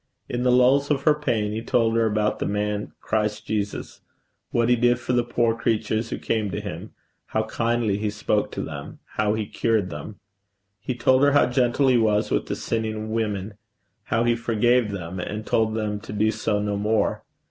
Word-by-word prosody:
In 120 Hz, -, -3 dB
the 125 Hz, 0 st, +3 dB
lulls 130 Hz, +3 st, +4 dB
of 140 Hz, -2 st, +1 dB
her 150 Hz, -, +5 dB
pain 120 Hz, -9 st, -1 dB
he 110 Hz, +1 st, -3 dB
told 115 Hz, -1 st, +1 dB
her 115 Hz, -1 st, +3 dB
about 105 Hz, 0 st, 0 dB
the -, -, -1 dB
man 105 Hz, 0 st, -2 dB
Christ 105 Hz, -1 st, -1 dB
Jesus 105 Hz, -1 st, -3 dB, 0.5 s
what 120 Hz, -1 st, +1 dB
he 125 Hz, -, +5 dB
did 120 Hz, +1 st, +3 dB
for 125 Hz, +1 st, -2 dB
the 120 Hz, -1 st, +3 dB
poor 120 Hz, -1 st, +1 dB
creatures 110 Hz, 0 st, -1 dB
who -, -, -3 dB
came 110 Hz, -3 st, -1 dB
to 90 Hz, -, -3 dB
him -, -, -6 dB, 0.4 s
how 110 Hz, -, 0 dB
kindly 115 Hz, -2 st, 0 dB
he 105 Hz, 0 st, -1 dB
spoke 105 Hz, 0 st, -1 dB
to -, -, -3 dB
them 75 Hz, -2 st, -7 dB, 0.2 s
how 105 Hz, 0 st, +2 dB
he 110 Hz, -1 st, -2 dB
cured 110 Hz, -3 st, 0 dB
them. 105 Hz, -, -8 dB, 0.6 s
He 125 Hz, +5 st, -4 dB
told 130 Hz, +2 st, +3 dB
her 145 Hz, 0 st, +5 dB
how 145 Hz, -, +5 dB
gentle 125 Hz, +2 st, +2 dB
he 125 Hz, -2 st, +5 dB
was 105 Hz, -2 st, +2 dB
with -, -, 0 dB
the -, -, -2 dB
sinning 110 Hz, -1 st, -3 dB
women, 105 Hz, -2 st, -2 dB, 0.5 s
how 115 Hz, 0 st, +1 dB
he 120 Hz, 0 st, +3 dB
forgave 115 Hz, 0 st, +2 dB
them 95 Hz, -2 st, -5 dB
and 105 Hz, +4 st, -4 dB
told 110 Hz, -1 st, +1 dB
them 105 Hz, -2 st, -2 dB
to 110 Hz, -, -10 dB
do 105 Hz, +1 st, +2 dB
so 105 Hz, -2 st, -1 dB
no 105 Hz, 0 st, -1 dB
more. 105 Hz, 0 st, 0 dB
110 Hz, 200 wpm, -24 LUFS, 105-120 Hz, 0.6 s, her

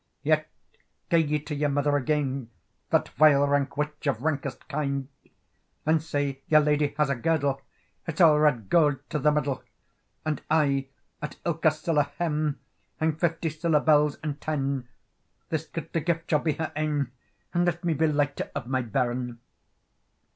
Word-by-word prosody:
"Yet 155 Hz, 0 st, +2 dB, 0.6 s
gae 170 Hz, -, +5 dB
ye 150 Hz, -1 st, +1 dB
to 150 Hz, +1 st, -6 dB
your 145 Hz, 0 st, 0 dB
mother 145 Hz, +1 st, +1 dB
again, 135 Hz, -3 st, -1 dB, 0.4 s
That -, -, +2 dB
vile 145 Hz, -2 st, +5 dB
rank 140 Hz, -1 st, 0 dB
witch, 150 Hz, 0 st, -3 dB
of 130 Hz, -3 st, 0 dB
rankest 150 Hz, -3 st, -2 dB
kind! 140 Hz, -2 st, -2 dB, 0.8 s
And 160 Hz, 0 st, +3 dB
say, 145 Hz, -3 st, -2 dB
your 155 Hz, -1 st, +6 dB
ladye 150 Hz, -1 st, +1 dB
has 150 Hz, -2 st, +2 dB
a -, -, +1 dB
girdle, 140 Hz, 0 st, 0 dB, 0.5 s
It's 165 Hz, -1 st, -4 dB
all 155 Hz, -4 st, +7 dB
red 135 Hz, -9 st, +2 dB
gowd 145 Hz, -, +2 dB
to 150 Hz, -, 0 dB
the 150 Hz, +2 st, +4 dB
middle; 145 Hz, -3 st, -1 dB, 0.6 s
"And 155 Hz, -1 st, -1 dB
aye, 140 Hz, -3 st, +2 dB, 0.3 s
at 150 Hz, -, -5 dB
ilka 165 Hz, -1 st, +3 dB
siller 155 Hz, -1 st, 0 dB
hem, 155 Hz, -4 st, 0 dB, 0.4 s
Hang 160 Hz, -1 st, +1 dB
fifty 165 Hz, -1 st, 0 dB
siller 155 Hz, 0 st, +2 dB
bells 150 Hz, -1 st, +3 dB
and 150 Hz, -2 st, -4 dB
ten; 140 Hz, -4 st, -2 dB, 0.6 s
This 160 Hz, 0 st, -2 dB
gudely 165 Hz, 0 st, -4 dB
gift 165 Hz, 0 st, -1 dB
shall 150 Hz, -, +4 dB
be 155 Hz, 0 st, 0 dB
her 155 Hz, +1 st, -4 dB
ain, 150 Hz, -4 st, -1 dB, 0.4 s
And 175 Hz, 0 st, +2 dB
let 175 Hz, 0 st, -1 dB
me 170 Hz, -2 st, +1 dB
be 160 Hz, +1 st, +2 dB
lighter 145 Hz, -2 st, 0 dB
of -, -, -3 dB
my 130 Hz, +1 st, 0 dB
bairn." 120 Hz, 0 st, -2 dB
150 Hz, 160 wpm, -27 LUFS, 140-155 Hz, 0.8 s, all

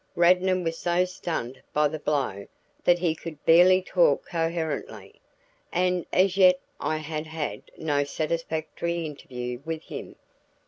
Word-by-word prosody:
Radnor 180 Hz, +2 st, +4 dB
was 165 Hz, -2 st, -3 dB
so 175 Hz, +1 st, +2 dB
stunned 160 Hz, -8 st, -5 dB
by 150 Hz, 0 st, +4 dB
the 155 Hz, +1 st, -5 dB
blow 135 Hz, -10 st, -1 dB, 0.4 s
that 175 Hz, -, +5 dB
he 170 Hz, -2 st, +1 dB
could 155 Hz, -2 st, -9 dB
barely 180 Hz, +3 st, +6 dB
talk -, -, +2 dB
coherently, 160 Hz, -, -3 dB, 0.5 s
and 180 Hz, 0 st, +1 dB
as 190 Hz, +1 st, +3 dB
yet 180 Hz, -1 st, +6 dB, 0.2 s
I 155 Hz, +2 st, -1 dB
had 155 Hz, 0 st, -5 dB
had 155 Hz, -1 st, -4 dB, 0.2 s
no 145 Hz, -3 st, +1 dB
satisfactory 165 Hz, +2 st, -2 dB
interview 125 Hz, -5 st, -6 dB
with 160 Hz, 0 st, -4 dB
him. -, -, -8 dB
165 Hz, 135 wpm, -26 LUFS, 150-175 Hz, 0.5 s, barely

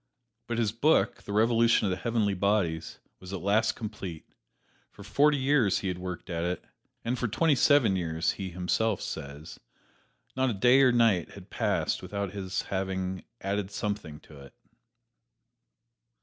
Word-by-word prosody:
But 120 Hz, 0 st, -2 dB
his 110 Hz, -3 st, +1 dB
book, 145 Hz, +8 st, +2 dB
"The -, -, -8 dB
Revolution 115 Hz, +2 st, +3 dB
of 95 Hz, -, +1 dB
the 90 Hz, -, -1 dB
Heavenly 110 Hz, -1 st, 0 dB
Bodies," 95 Hz, -4 st, 0 dB, 0.2 s
was 95 Hz, 0 st, -10 dB
at 95 Hz, -, -4 dB
last 105 Hz, +3 st, +2 dB
complete. 100 Hz, -7 st, -7 dB, 0.6 s
For -, -, -13 dB
forty 145 Hz, 0 st, +3 dB
years 130 Hz, -7 st, +2 dB
he 95 Hz, -, -2 dB
had 90 Hz, -1 st, -4 dB
worked 90 Hz, -1 st, -6 dB
at 85 Hz, 0 st, -2 dB
it, 90 Hz, 0 st, -3 dB, 0.4 s
and 120 Hz, +2 st, -1 dB
for 125 Hz, -, 0 dB
twenty 155 Hz, +8 st, +2 dB
seven 135 Hz, -7 st, +4 dB
years, 80 Hz, -3 st, 0 dB
he 95 Hz, -2 st, -5 dB
himself 90 Hz, +4 st, 0 dB
says, 70 Hz, +3 st, -7 dB, 0.8 s
not 130 Hz, 0 st, +1 dB
a 115 Hz, -, -2 dB
day 125 Hz, +6 st, +5 dB
or 135 Hz, -, +6 dB
a -, -, +3 dB
night 115 Hz, -8 st, +2 dB
had -, -, -13 dB
passed -, -, 0 dB
without 100 Hz, -2 st, -4 dB
his 95 Hz, -2 st, -3 dB
having 95 Hz, -1 st, -3 dB, 0.2 s
added 100 Hz, 0 st, -2 dB
something 100 Hz, -7 st, -4 dB
to 75 Hz, -2 st, -15 dB
it. 70 Hz, -1 st, -14 dB
100 Hz, 165 wpm, -28 LUFS, 90-115 Hz, 0.8 s, or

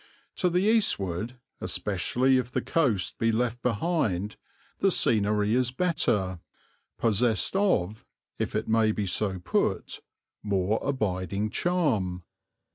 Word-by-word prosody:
To 180 Hz, -, +2 dB
the 180 Hz, +2 st, +1 dB
eastward, 125 Hz, -, +1 dB, 0.2 s
especially 130 Hz, +1 st, +1 dB
if 125 Hz, -1 st, -3 dB
the -, -, -1 dB
coast 125 Hz, -, 0 dB
be 115 Hz, 0 st, +2 dB
left 120 Hz, +1 st, -1 dB
behind, 110 Hz, -, -1 dB, 0.4 s
the -, -, +3 dB
scenery 105 Hz, -1 st, +2 dB
is 125 Hz, 0 st, +2 dB
better, 110 Hz, -, 0 dB, 0.6 s
possessed 115 Hz, -, +1 dB
of, 110 Hz, -, +1 dB, 0.4 s
if -, -, -2 dB
it 110 Hz, -, -1 dB
may 110 Hz, -1 st, +3 dB
be 105 Hz, -, -2 dB
so 95 Hz, 0 st, -1 dB
put, 90 Hz, -, -1 dB, 0.4 s
more 100 Hz, +1 st, 0 dB
abiding 100 Hz, -, -2 dB
charm. 110 Hz, -, 0 dB
110 Hz, 120 wpm, -27 LUFS, 100-130 Hz, 0.6 s, the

